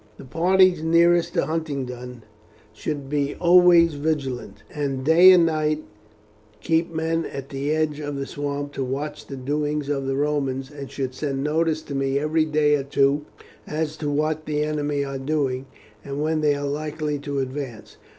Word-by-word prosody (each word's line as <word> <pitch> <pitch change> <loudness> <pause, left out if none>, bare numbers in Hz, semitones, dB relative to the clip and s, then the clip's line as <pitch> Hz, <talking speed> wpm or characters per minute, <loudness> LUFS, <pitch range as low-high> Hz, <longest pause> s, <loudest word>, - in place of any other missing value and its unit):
"The - - -11
parties 180 +4 +3
nearest 170 +1 +3
to - - +2
Huntingdon 130 -6 -4 0.5
should 140 +5 -4
be 145 0 -1
always 175 -2 +6
vigilant, 145 -4 -3
and 135 -3 -3
day 170 +4 +8
and 175 -2 +6
night 155 -1 0 0.8
keep 165 +1 0
men 165 0 -1
at 135 0 -7
the 140 +1 -3
edge 155 -1 0
of 145 -1 -4
the 140 0 -3
swamp 145 0 -4
to 135 - -2
watch 145 +3 -4
the 140 - -6
doings 145 +2 -2
of 135 -2 -1
the 135 - 0
Romans, 135 -2 -1
and 140 -2 -8
should 130 -2 -4
send 135 0 -3
notice 155 +1 0
to 140 - -7
me 135 0 0
every 155 +2 +1
day 150 -1 +2
or 140 - -3
two 140 +1 +1 0.4
as 155 0 -2
to 150 - -3
what 155 +1 -1
the 150 -1 0
enemy 145 -1 -1
are 135 -1 -5
doing, 135 -2 -1 0.4
and 140 0 -5
when 155 +1 0
they 150 -1 +3
are 145 0 -4
likely 150 0 -3
to 140 0 -4
advance. 130 -4 -5
150 Hz, 170 wpm, -23 LUFS, 140-155 Hz, 0.8 s, day